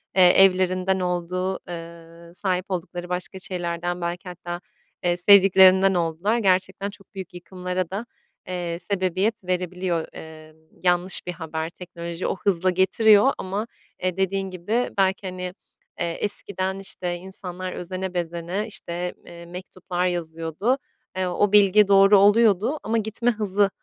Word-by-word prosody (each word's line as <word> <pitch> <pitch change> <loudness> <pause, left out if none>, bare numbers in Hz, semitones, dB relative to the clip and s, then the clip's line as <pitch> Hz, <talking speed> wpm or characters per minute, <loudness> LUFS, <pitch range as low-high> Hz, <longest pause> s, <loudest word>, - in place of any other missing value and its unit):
eee, 185 -2 +7 0.2
evlerinden 185 0 +2
olduğu, 180 +1 -2
eee, 170 0 -10
sahip 185 -1 -1
oldukları 175 0 -4
başka 180 +1 -3
şeylerden 175 -1 -3
belki 175 +1 -4
hatta, 175 0 -6 0.4
eee, 175 0 +1
sevdiklerinden 190 0 +7
oldular. 175 +6 0
Gerçekten 195 -1 +1
çok 200 +1 -17
büyük 190 -1 -7
yıkımlara 180 0 -4
da, 205 +5 -4 0.4
eee, 175 -2 -3
sebebiyet 190 +3 -1
verebiliyor, 180 -2 -2
eee, 155 -1 -11 0.3
yanlış 180 +1 +1
bir 180 - -1
haber. 160 -1 -4
Teknoloji 170 0 -6
o - - -1
hızla 185 -2 +1
getiriyor 205 +6 +5
ama, 200 +4 -3 0.4
eee, 185 0 -1
dediğin 195 0 0
gibi 210 +7 -1
belki, 190 0 +1
hani, 180 0 -5 0.5
eee, 170 -1 -1
eskiden, 190 -2 -2
işte, 180 -2 -3
insanlar 185 0 -7
özene 185 +1 -5
bezene, 175 +4 -3
işte, 175 -3 -5
eee, 170 0 -11
mektuplar 180 0 -4
yazıyordu, 165 - -1 0.4
eee, 185 - 0
o 190 +3 +1
bilgi 205 0 +6
doğru 195 +1 +7
oluyordu 215 +6 +4
ama 225 +1 0
gitme 220 +3 0
hızı 205 -2 +1
185 Hz, 135 wpm, -24 LUFS, 175-195 Hz, 0.5 s, eee